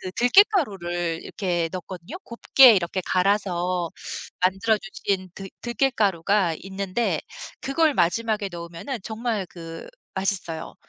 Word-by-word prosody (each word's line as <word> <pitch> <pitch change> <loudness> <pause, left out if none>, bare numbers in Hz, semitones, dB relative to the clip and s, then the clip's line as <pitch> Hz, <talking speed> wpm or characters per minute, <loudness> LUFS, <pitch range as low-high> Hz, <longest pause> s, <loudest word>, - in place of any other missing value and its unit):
그 185 - -6
들깨가루를 195 - +3
이렇게 175 -4 -1
넣거든요. 185 - -7
곱게 250 +1 +6
이렇게 185 0 0
갈아서 180 -3 +1 0.5
만들어 195 +4 +3
주신 195 -3 -3
들 195 -1 -8
들깨가루가 205 -8 +1
있는데 195 +4 -2 0.4
그걸 310 +3 +2
마지막에 210 +3 +1
넣으면은 170 +10 -6
정말 220 -3 -2
그 165 -2 -9 0.3
맛있어요. 190 -4 -3
195 Hz, 285 characters per minute, -24 LUFS, 175-230 Hz, 0.5 s, 곱게